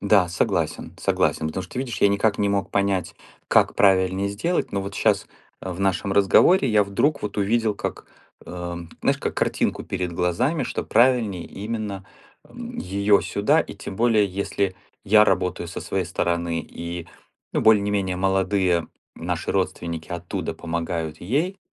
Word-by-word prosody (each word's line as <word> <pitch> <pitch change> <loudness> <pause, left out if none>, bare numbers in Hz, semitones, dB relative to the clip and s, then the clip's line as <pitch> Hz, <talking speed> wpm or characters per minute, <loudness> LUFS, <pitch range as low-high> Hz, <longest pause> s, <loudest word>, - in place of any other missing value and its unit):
Да, 100 -3 +4
согласен, 85 - -1
согласен. 80 - +1
Потому 95 +4 -4
что 90 - -12
ты - - -4
видишь, 120 -6 -4
я 100 - +6
никак 100 +1 +1
не 100 -1 +2
мог 100 -1 -1
понять, 100 -2 0 0.3
как - - +4
правильнее 95 0 +3
сделать, 165 - -1
но 100 - 0
вот 100 +1 -6
щас, 100 -2 +2 0.3
а, 95 - -5
в 90 - -8
нашем 95 +1 0
разговоре, 130 - +5
я 105 -2 +4
вдруг 120 +10 0
вот 105 - -4
увидел, 110 +1 +1
как, - - -5 0.4
ам, 85 -1 -6
знаешь, - - +2
как - - -3
картинку - - 0
перед 90 -2 -3
глазами, 120 - 0
что - - -3
правильней 115 -6 +3
именно, 105 -2 -5 0.4
м, 240 0 -8
её 100 +2 +2
сюда. - - +2
И - - -6
тем 95 - -8
более, 115 -3 +3
если 100 0 -2 0.3
я 105 +1 +6
работаю 90 -3 0
со - - -6
своей - - -2
стороны 85 -1 -1
и, 85 0 -7 0.4
ну, - - +1
более 110 -2 +5
не 105 - -1
менее 95 -3 -1
молодые 95 -3 +1 0.3
наши - - -3
родственники 85 -2 -2
оттуда 85 -1 -4
помогают 80 -1 -4
ей, 155 - -1
100 Hz, 165 wpm, -23 LUFS, 90-105 Hz, 0.4 s, я